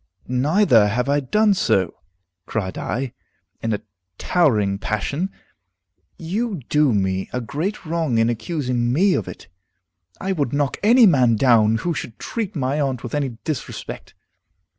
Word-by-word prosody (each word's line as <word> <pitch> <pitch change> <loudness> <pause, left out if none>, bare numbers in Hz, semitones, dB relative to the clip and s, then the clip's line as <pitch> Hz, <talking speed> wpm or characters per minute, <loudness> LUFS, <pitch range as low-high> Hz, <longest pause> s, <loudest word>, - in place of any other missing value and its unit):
"Neither 125 - +4
have 125 +5 -1
I 145 +1 +3
done 210 +10 +2
so," 95 - +1 0.5
cried 100 -4 -3
I, 130 0 -3 0.5
in 115 - -1
a 105 - -1 0.4
towering 105 - +2
passion. 140 - -2 0.9
"You 195 +2 -3
do 150 -3 +3
me 95 -2 0
a 125 - -2
great 160 - -4
wrong 160 -6 0
in 115 0 +3
accusing 120 0 -1
me 185 +8 +3
of - - -1
it. 90 - -10 0.7
I 190 - -2
would 145 -9 -1
knock 145 -1 0
any 235 +3 +6
man 130 - +4
down 110 -2 +4
who 170 +8 -2
should 125 -6 -6
treat 215 -4 -4
my 140 0 -1
aunt 130 -3 -2
with 120 - -6
any 135 -6 -2
disrespect. 155 -3 -6
135 Hz, 145 wpm, -21 LUFS, 115-170 Hz, 0.9 s, any